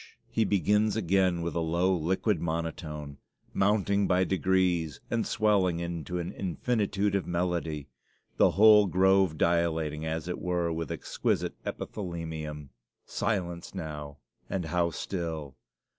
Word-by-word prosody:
he 110 - +2
begins 105 +2 +2
again 95 -4 +2
with 85 - -2
a 85 - -1
low, 85 +3 +1
liquid 95 +3 0
monotone, 80 -3 -4 0.3
mounting 100 0 +2
by 90 0 +3
degrees 90 -5 +1
and 115 -1 0
swelling 100 -6 +2
into 85 +1 -4
an 85 -1 -3
infinitude 100 +1 -1
of 100 -2 0
melody 85 -4 -2 0.5
the - - +6
whole 105 -1 +8
grove 95 -2 +3
dilating, 80 -3 +1
as 80 +1 -3
it 90 - -3
were, 90 -2 -1
with 80 -2 -4
exquisite - - -1
epithalamium. 80 -6 -5 0.4
Silence 85 -5 -2
now 75 -2 -6 0.3
and 95 -3 -2
how 85 +2 +1
still! 80 -6 -4
85 Hz, 125 wpm, -29 LUFS, 80-95 Hz, 0.5 s, whole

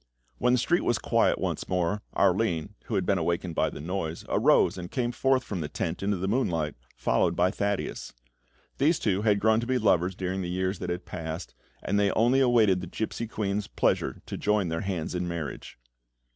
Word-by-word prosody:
When 125 +2 +3
the - - +4
street 170 +8 +2
was 120 - +2
quiet - - +2
once - - -3
more, 90 +3 0
Arline, 95 -2 +1
who 110 - -3
had 95 -2 +1
been 95 -1 +2
awakened 85 +1 -1
by 80 - +1
the - - -9
noise, 85 0 -4
arose - - +4
and 90 -1 -6
came 120 0 -1
forth 130 +1 +2
from 95 -7 -4
the 75 - -4
tent 85 +3 -3
into 100 0 0
the 95 +2 -2
moonlight, 85 - 0 0.2
followed - - +1
by 90 +1 +3
Thaddeus. 100 0 -2 0.7
These 155 +4 +4
two 100 -2 0
had 105 -2 +3
grown 110 +1 +3
to 120 - -4
be 130 0 +2
lovers 95 -5 +2
during 95 0 -2
the 90 - -3
years 95 +1 -1
that - - -4
had 90 +1 -3
passed, 80 0 -6 0.3
and 100 - +1
they 100 -1 +3
only 120 +4 +3
awaited 115 -8 +4
the 90 - -6
gipsy 110 +5 -3
queen's 105 -2 -2
pleasure - - 0
to - - -5
join 105 -4 +1
their 80 0 -2
hands 90 -5 -3
in 90 0 -2
marriage. 85 -7 -5
95 Hz, 200 wpm, -27 LUFS, 85-110 Hz, 0.7 s, the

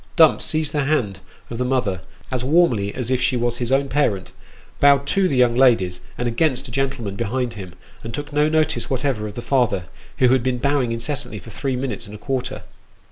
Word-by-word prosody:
Dumps 160 -4 +5
seized 155 -1 -1
the 145 -2 0
hand 110 -11 0 0.3
of 115 - -5
the - - +1
mother 125 -8 0 0.3
as 125 -2 -2
warmly 130 - +3
as 125 -1 -3
if 130 -1 +1
she 130 0 +2
was 120 0 0
his 120 0 -3
own 140 +1 +2
parent, 130 -9 0 0.5
bowed 140 0 +5
to 190 +6 +2
the 140 - -1
young 125 -1 +4
ladies, 115 -9 +3 0.2
and 120 - -1
against 130 +2 0
a - - -10
gentleman 125 -6 -2
behind 120 +2 -2
him, 95 -5 -9 0.3
and 115 - -6
took 145 +3 -6
no 150 +1 +3
notice 155 -6 +1
whatever 130 -5 -1
of 105 - -9
the 120 - -6
father, 120 -8 +1 0.3
who 125 - +4
had 130 0 +4
been 125 0 0
bowing 135 -1 +1
incessantly 115 -1 -3
for 115 - -11
three 135 +3 -2
minutes 125 -3 -4
and 105 - -9
a - - -7
quarter. 130 +2 -3
125 Hz, 210 wpm, -21 LUFS, 115-140 Hz, 0.5 s, Dumps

